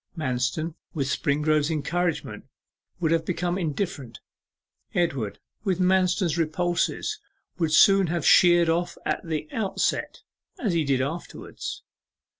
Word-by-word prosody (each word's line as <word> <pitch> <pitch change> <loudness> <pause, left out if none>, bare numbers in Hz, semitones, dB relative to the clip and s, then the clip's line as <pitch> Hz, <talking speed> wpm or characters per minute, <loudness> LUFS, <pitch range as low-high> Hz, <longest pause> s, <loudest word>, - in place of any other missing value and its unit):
Manston 130 +3 -1 0.2
with 140 -3 0
Springrove's 150 +2 +1
encouragement 165 +2 -2 0.5
would 165 -3 +1
have 165 -1 +2
become 175 +1 -1
indifferent. 150 - -3 0.8
Edward 140 - 0 0.3
with 190 -4 0
Manston's 185 -2 +2
repulses 175 +2 -1 0.4
would 160 -3 +2 0.3
have 170 -3 -1
sheered 175 -2 +6
off 170 +2 0
at - - -1
the 155 -2 -3
outset, 210 -4 -1 0.4
as 215 -8 -1
he 165 -2 +2
did 135 -2 +1
afterwards. 160 +6 -6
165 Hz, 110 wpm, -25 LUFS, 150-175 Hz, 0.8 s, sheered